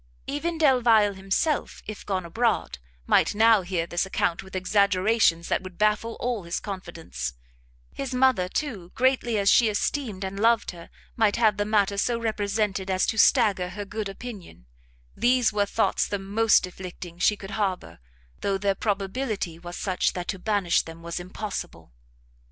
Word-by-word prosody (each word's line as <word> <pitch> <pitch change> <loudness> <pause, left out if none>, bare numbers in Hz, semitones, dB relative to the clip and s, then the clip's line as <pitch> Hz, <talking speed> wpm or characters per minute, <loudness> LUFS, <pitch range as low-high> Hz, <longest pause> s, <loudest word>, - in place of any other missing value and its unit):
Even 320 +4 -3
Delvile 240 -8 +4
himself, 195 +11 -1
if 215 -1 -7
gone 190 -3 -2
abroad, 200 - -1 0.3
might - - +3
now 220 -1 +5
hear 175 -2 -2
this 175 0 -1
account 180 -3 -1
with 190 0 -12
exaggerations 190 -1 +2
that - - 0
would 185 -2 -10
baffle 215 +2 +1
all 240 -3 -2
his 170 0 -3
confidence: 165 - -6 0.6
his 275 -2 -5
mother, 250 -8 +2
too, 200 - -4
greatly 255 -3 +2
as 200 -1 0
she 225 +2 +6
esteemed 215 -1 -2
and 195 +1 -5
loved 230 0 +3
her, 170 -2 -12 0.3
might 220 -3 +2
have 220 -4 +3
the 205 - 0
matter 205 -2 +1
so 235 +2 +1
represented 205 -3 -1
as 185 0 +2
to 220 - -1
stagger 205 -8 +4
her 205 +3 -6
good 205 0 -4
opinion; 195 - -10 0.5
these 240 -1 +2
were 205 -1 +1
thoughts 220 - +1
the 205 - -2
most 205 +2 +3
afflicting 180 -1 -9
she 210 +3 +3
could 195 0 -9
harbour, 185 - -3 0.4
though 195 -1 0
their 200 0 +1
probability 195 -3 -2
was 175 0 -8
such 185 -2 0
that 180 -1 -5
to 190 - -3
banish 200 -3 +1
them 165 0 -11
was 170 +1 -4
impossible. 175 - -7
200 Hz, 165 wpm, -25 LUFS, 185-225 Hz, 0.6 s, she